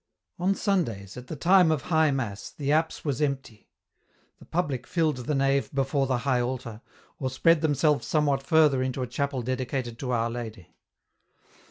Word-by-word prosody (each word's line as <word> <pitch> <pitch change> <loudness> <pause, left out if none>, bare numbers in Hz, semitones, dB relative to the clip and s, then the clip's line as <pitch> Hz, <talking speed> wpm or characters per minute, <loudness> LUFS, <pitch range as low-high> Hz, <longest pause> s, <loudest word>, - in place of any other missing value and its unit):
On 190 +3 +2
Sundays, 115 - -1
at 125 0 -9
the - - -5
time 180 +3 +5
of 155 -4 0
High 160 -3 +3
Mass, 120 -8 -3
the 145 -1 -3
apse 160 +2 0
was 140 -2 -1
empty. 135 -7 -3 0.7
The - - -15
public 145 -7 -2
filled 160 -5 +1
the 130 +4 -2
nave 135 0 +1
before 135 0 +1
the 130 -1 +1
high 130 -3 +2
altar, 120 -3 -4 0.4
or 130 - -1
spread 165 +5 +3
themselves 150 -1 +2
somewhat 145 -3 +1
further 150 -2 +4
into 130 0 -2
a - - -1
chapel 135 +1 -2
dedicated 125 -1 -3
to 130 - -4
Our 115 -1 0
Lady. 110 -7 -7
135 Hz, 170 wpm, -27 LUFS, 125-155 Hz, 0.7 s, time